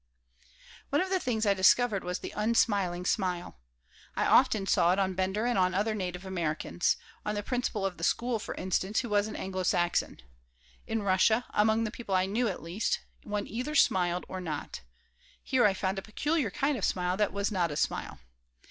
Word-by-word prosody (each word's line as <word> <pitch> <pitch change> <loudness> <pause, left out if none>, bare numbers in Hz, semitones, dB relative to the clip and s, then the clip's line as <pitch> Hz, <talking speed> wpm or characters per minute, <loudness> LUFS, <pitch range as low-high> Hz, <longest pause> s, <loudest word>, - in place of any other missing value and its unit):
One 285 - +2
of 375 +1 -1
the 380 - +2
things 230 -7 -1
I 200 - +4
discovered 200 +2 +3
was 180 0 -2
the - - -8
unsmiling 200 -5 +1
smile. 180 - -1 0.6
I - - +1
often 200 -3 +4
saw 175 -2 +3
it - - -1
on 190 -1 +1
Bender 190 +4 -1
and 240 -4 +1
on 185 0 +2
other 210 +3 +1
native 180 -2 -4
Americans 175 -1 -1 0.3
on 210 - -2
the 205 - -3
principal 245 -4 -2
of 190 -2 -3
the 165 - -8
school, 235 +5 +1
for - - -6
instance, 190 +3 0
who 240 - -6
was 205 0 +2
an 215 - -7
Anglo 190 0 -4
Saxon. 175 -1 0 0.7
In 220 -1 -1
Russia, 200 +5 +3
among 220 +2 +3
the 220 - -2
people 230 -5 -3
I 185 0 +3
knew, 225 +5 0
at 190 - -4
least, 175 +6 -1 0.2
one 205 -1 -3
either 250 +8 -4
smiled 180 - +3
or 185 - -5
not. 155 -5 -5 0.6
here 255 -3 +2
I 200 -2 +3
found 190 0 -1
a - - -7
peculiar 295 - -1
kind 285 -3 0
of - - -7
smile 180 0 0
that 210 -1 +1
was 200 +2 -1
not 180 -4 +1
a 145 - -5
smile. - - -2
200 Hz, 195 wpm, -29 LUFS, 185-225 Hz, 0.7 s, I